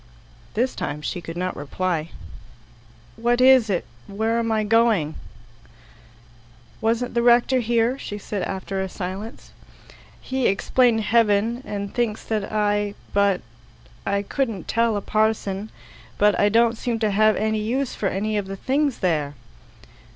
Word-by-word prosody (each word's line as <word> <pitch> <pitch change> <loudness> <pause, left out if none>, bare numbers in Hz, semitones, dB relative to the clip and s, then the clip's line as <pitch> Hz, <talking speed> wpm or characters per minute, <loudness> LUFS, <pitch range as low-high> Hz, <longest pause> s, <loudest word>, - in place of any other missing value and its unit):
This 245 +4 +1
time 150 +1 -4
she 175 - -3
could 165 0 -7
not 185 +1 -2
reply. 165 +2 -2 1.1
"What 240 +2 +1
is 255 -3 +6
it? 185 -3 0 0.2
Where 220 +3 0
am 230 -1 -1
I 215 -1 +1
going?" 215 -8 +3 1.7
"Wasn't 230 +2 0
the 235 - +2
rector 240 +2 +4
here?" 235 +2 +1
said 205 - -6
she 205 - -5
after 190 0 -3
a 190 - -3
silence. 195 +6 -7 0.7
"He 260 -1 -1
explained 225 +3 +2
heaven, 225 +1 +2
and 200 -1 -5
thinks 230 -3 -1
that 215 -3 -2
I 205 -1 0 0.2
but 200 -2 +2 0.6
I 200 0 0
couldn't 225 - -2
tell 230 -2 +1
a - - -3
parson; 215 -1 0 0.5
but 210 0 +4
I 205 - +4
don't 230 +1 +3
seem 240 -2 -1
to 215 -2 0
have 215 +2 +4
any 220 0 0
use 250 +5 -1
for 195 - -1
any 215 +2 -1
of 195 - -5
the 195 0 -6
things 275 +4 0
there." 150 -5 0
215 Hz, 145 wpm, -23 LUFS, 195-235 Hz, 1.7 s, is